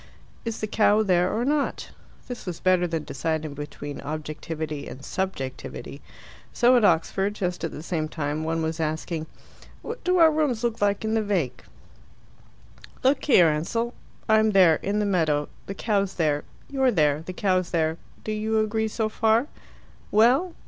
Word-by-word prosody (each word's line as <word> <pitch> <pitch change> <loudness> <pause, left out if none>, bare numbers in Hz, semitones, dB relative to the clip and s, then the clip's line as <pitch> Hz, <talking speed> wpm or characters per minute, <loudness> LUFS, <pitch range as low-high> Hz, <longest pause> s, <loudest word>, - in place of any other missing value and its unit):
Is 230 -1 -4
the - - 0
cow 215 0 +3
there 180 -2 +2
or 230 +3 -1
not? 290 +1 -1 0.4
This 245 -5 -7
was 175 -2 -4
better 185 -1 +3
than 165 -2 -2
deciding 155 +1 -3
between 145 0 -7
objectivity 155 0 -5
and 135 +2 -9
subjectivity. 135 -10 -5 0.5
So 245 +1 +4
at 240 - +4
Oxford, 195 +3 +2
just 180 -4 -3
at 165 - -1
the 150 - -8
same 160 -2 -2
time, 155 0 -3
one 165 0 -1
was 160 +1 -2
asking, 160 +1 -2 0.6
"What 460 +2 -6
do 365 0 +2
our 325 -2 +7
rooms 290 -7 0
look 235 -2 -1
like 205 +1 +1
in 220 - 0
the 225 - +2
vac.?" 190 - -2 1.4
"Look 265 +3 +2
here, 180 - +6
Ansell. 230 +11 -1 0.3
I'm 220 0 +4
there 180 -5 +6
in 200 +1 -2
the 210 - +1
meadow 155 -7 +1 0.2
the 195 - -5
cow's 200 -2 0
there. 150 -3 0 0.2
You're 265 -2 +2
there 150 -8 +2
the 185 - -6
cow's 185 -2 +1
there. 160 -1 0 0.2
Do 215 - -3
you 215 +1 0
agree 220 +1 0
so 220 0 -1
far?" 220 +3 +2 0.6
"Well?" 255 - +3
185 Hz, 165 wpm, -25 LUFS, 160-220 Hz, 1.4 s, our